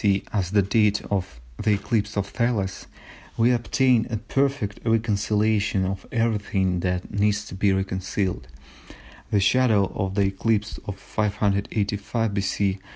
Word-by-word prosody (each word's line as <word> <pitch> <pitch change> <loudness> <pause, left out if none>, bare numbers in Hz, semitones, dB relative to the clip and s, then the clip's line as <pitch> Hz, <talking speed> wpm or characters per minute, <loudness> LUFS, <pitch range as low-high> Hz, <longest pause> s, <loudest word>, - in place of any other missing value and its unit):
C. 100 -2 +3
as 95 -4 0
the 100 0 +3
date 105 +1 +2
of 90 -11 -2 0.2
the 105 0 +3
eclipse 105 0 -1
of 100 - +1
Thales, 105 -3 -2 0.5
we 115 +2 +4
obtain 120 0 +2
a 115 - -1
perfect 130 -1 -1
reconciliation 105 -2 +1
of 95 0 -4
everything 105 -5 0
that 90 0 -2
needs 105 +1 +1
to - - -9
be 95 +1 +2
reconciled; 95 -6 -2 0.8
the 105 - +2
shadow 105 -1 +3
of 95 0 -2
the 100 - +3
eclipse 105 +2 0
of 100 -1 -4
585 105 +1 -1
B. 100 0 0
100 Hz, 135 wpm, -24 LUFS, 95-110 Hz, 0.8 s, we